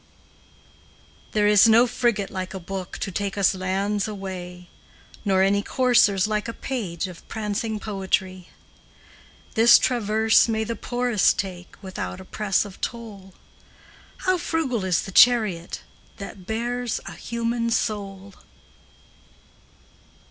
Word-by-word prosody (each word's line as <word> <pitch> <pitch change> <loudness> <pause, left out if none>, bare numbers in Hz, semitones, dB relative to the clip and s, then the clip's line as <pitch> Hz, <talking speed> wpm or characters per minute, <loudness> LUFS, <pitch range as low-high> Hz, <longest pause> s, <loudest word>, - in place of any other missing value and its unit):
There 210 -1 +2
is 210 +1 +6
no 230 +2 +6
frigate 235 -4 0
like 185 0 -5
a - - -4
book 185 +1 -6
To 195 - -4
take 200 +2 -3
us 200 -1 +3
lands 195 +3 -1
away, 180 -3 -7 0.6
Nor 190 -2 +3
any 200 +1 +2
coursers 230 -6 +3
like 215 +1 -1
a 230 - -4
page 200 -11 -4
Of 180 -2 -12
prancing 215 0 -3
poetry. 190 -3 -2 1.0
This 230 +2 +7
traverse 220 -2 +3
may 220 -1 0
the 230 +1 -3
poorest 245 -5 +1
take 180 -2 -5
Without 185 -1 -5
oppress 195 +1 -1
of 200 -2 -12
toll; 205 -5 -6 0.9
How 370 -1 +2
frugal 270 - -1
is 180 -3 +1
the 195 - -8
chariot 210 -7 +4 0.4
That 195 -2 -9
bears 240 +1 -2
a - - -7
human 235 0 -2
soul! 200 -4 -3
205 Hz, 120 wpm, -24 LUFS, 190-230 Hz, 1.0 s, This